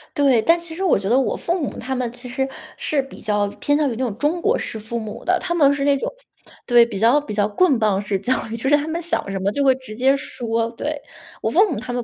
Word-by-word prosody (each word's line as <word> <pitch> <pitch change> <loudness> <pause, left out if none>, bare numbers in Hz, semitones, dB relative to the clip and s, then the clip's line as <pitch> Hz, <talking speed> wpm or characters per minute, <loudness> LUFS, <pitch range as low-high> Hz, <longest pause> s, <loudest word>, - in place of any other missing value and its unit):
对， 270 -6 +4
但 335 +5 +4
其 335 -1 -7
实 380 - -3
我 355 - +3
觉 195 - -4
得 245 +4 +3
我 270 - +1
父 345 +2 -1
母 280 - -4
他 265 0 -3
们 245 -2 -2
其 250 +1 -10
实 265 +2 -2 0.3
是 290 -3 0
比 270 - -12
较 205 -1 0
偏 290 0 +2
向 300 -2 +2
于 - - -3
那 - - -8
种 210 -4 -3
中 320 +5 0
国 470 +4 +2
式 220 - -5
父 225 +2 -5
母 215 -1 -7
的。 365 +1 +2
他 345 -2 -2
们 285 -4 +5
是 280 0 -2
那 285 -1 +4
种 - - -3 0.5
对， 240 -1 +6
比 205 -5 -6
较 245 +7 +4
比 215 - -7
较 205 0 +1
棍 280 - +3
棒 205 -2 +2
式 195 -1 -2
教 245 +6 +1 0.2
育， 230 - -4
就 265 - -3
是 290 - +6
他 295 +1 -1
们 335 +2 -3
想 330 -11 -1
什 195 - -3
么 195 +2 0
就 285 - 0
会 265 -1 +5
直 260 -5 -10
接 265 +3 +3
说， 230 -3 -2
对。 295 +5 -4 0.4
我 - - 0
父 390 +1 +4
母 250 - -2
他 245 +1 -6
们 245 -1 -2
260 Hz, 305 characters per minute, -21 LUFS, 225-295 Hz, 0.5 s, 对